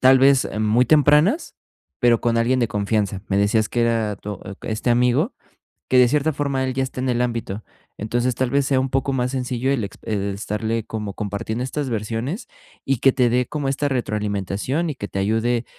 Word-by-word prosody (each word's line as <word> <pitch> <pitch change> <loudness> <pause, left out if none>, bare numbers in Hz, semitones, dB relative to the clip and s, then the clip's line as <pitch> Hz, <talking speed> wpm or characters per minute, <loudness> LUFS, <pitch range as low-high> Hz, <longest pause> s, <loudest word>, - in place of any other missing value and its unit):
tal 130 0 +6
vez 135 0 +4
muy 110 +4 +3
tempranas, 150 - +4 0.5
pero 120 -3 +4
con 115 -1 +2
alguien 120 +3 +2
de 120 - +1
confianza. 100 -1 -1
Me 100 - +1
decías 105 +2 +2
que 120 - 0
era 115 -3 0
tu 105 -1 -7
e 95 - -8 0.2
este 110 +3 -2
amigo, 125 - +2 0.5
que 130 - +4
de 125 - +7
cierta 150 +4 +1
forma 140 -2 -1
él 130 - -1
ya 135 - 0
está 130 -1 -6
en 130 - -1
el 120 -1 +1
ámbito. 115 -4 -3 0.4
Entonces, 120 +3 0
tal 130 -1 0
vez 140 +1 +2
sea 135 -2 +2
un 130 -1 -2
poco 135 +1 0
más 125 0 -1
sencillo 130 0 -1
el 130 - 0
ex 100 - -9
e 100 -2 -1
estarle 110 +2 -2
como 105 -3 -5
compartiendo 105 +3 -3
estas 130 0 -3
versiones 115 - -3 0.4
y 135 -3 0
que 135 - +5
te 125 -2 +3
dé 125 +1 +2
como 145 -2 -3
esta 140 +1 0
retroalimentación 105 - -2
y - - -4
que 100 -5 -6
te 95 - -5
ayude, 115 +4 +1
120 Hz, 205 wpm, -22 LUFS, 110-135 Hz, 0.5 s, de